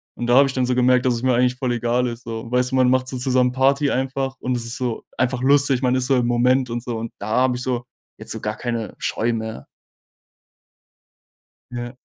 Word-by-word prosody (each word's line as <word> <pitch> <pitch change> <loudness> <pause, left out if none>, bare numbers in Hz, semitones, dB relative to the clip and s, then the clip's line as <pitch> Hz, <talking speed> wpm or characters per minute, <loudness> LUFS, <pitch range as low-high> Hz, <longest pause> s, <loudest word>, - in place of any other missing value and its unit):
Und 120 - -4
da 120 - +4
habe 140 +1 +6
ich 135 - -4
dann 130 -1 0
so 125 - +1
gemerkt, 125 0 +3
dass 125 - +2
es 115 - -5
mir 130 - +3
eigentlich 125 +1 +2
voll 125 0 -2
egal 120 +1 0
ist 120 0 -7
so. 115 0 -6
Weißt 125 0 +2
du, - - 0
man 130 -1 +4
macht 130 0 +1
so 130 - -4
zusammen 125 0 +2
Party 140 +2 +2
einfach 135 0 -2
und 125 0 -2
es 120 -1 -3
ist 115 - -4
so 125 -3 -3
einfach 125 0 0
lustig. 140 -1 +3
Man 125 -1 +2
ist 130 -1 0
so 135 - +3
im 120 -1 +1
Moment 125 +2 +2
und 120 0 -4
so. 120 -2 -4
Und 115 0 -5
da 100 - -6
habe 125 +2 +2
ich 125 - -5
so 125 -1 -2 0.3
jetzt - - -8
so - - -4
gar 105 0 -3
keine 115 -3 -4
Scheu 120 +1 -1
mehr. 110 -10 -5 2.1
Ja. 120 0 -5
125 Hz, 240 wpm, -21 LUFS, 120-130 Hz, 2.1 s, habe